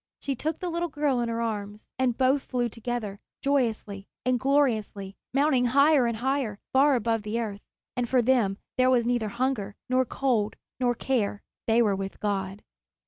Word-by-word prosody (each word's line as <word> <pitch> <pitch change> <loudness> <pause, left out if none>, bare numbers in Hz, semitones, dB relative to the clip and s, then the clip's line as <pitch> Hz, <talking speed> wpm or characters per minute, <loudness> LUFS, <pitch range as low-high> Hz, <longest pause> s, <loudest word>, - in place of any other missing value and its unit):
She 275 - -2
took 310 +5 -2
the 360 - -3
little 340 +1 -1
girl 290 -4 0
in 235 -1 -1
her 230 0 -2
arms, 210 -2 -4
and 250 -3 +1
both 265 +2 +3
flew 245 -2 -1
together, 230 -3 -4 0.2
joyously 225 -8 0 0.2
and 255 -1 +2
gloriously, 230 -8 +1 0.2
mounting 275 -2 +3
higher 280 +1 +5
and 235 -1 -2
higher, 260 -3 -1 0.2
far 275 +1 +5
above 230 -1 0
the 210 +2 -2
earth; 205 -3 -4 0.3
and 245 -1 -1
for 255 -2 +3
them 230 -6 +2 0.2
there 255 0 +5
was 245 -2 +3
neither 240 -3 0
hunger, 235 -4 -2 0.2
nor 255 0 +4
cold, 235 -6 0 0.2
nor 245 -1 +2
care; 220 -5 -1 0.2
they 230 +1 +4
were 205 -3 +2
with 195 0 -5
God. 195 -1 -2
240 Hz, 175 wpm, -27 LUFS, 210-265 Hz, 0.3 s, higher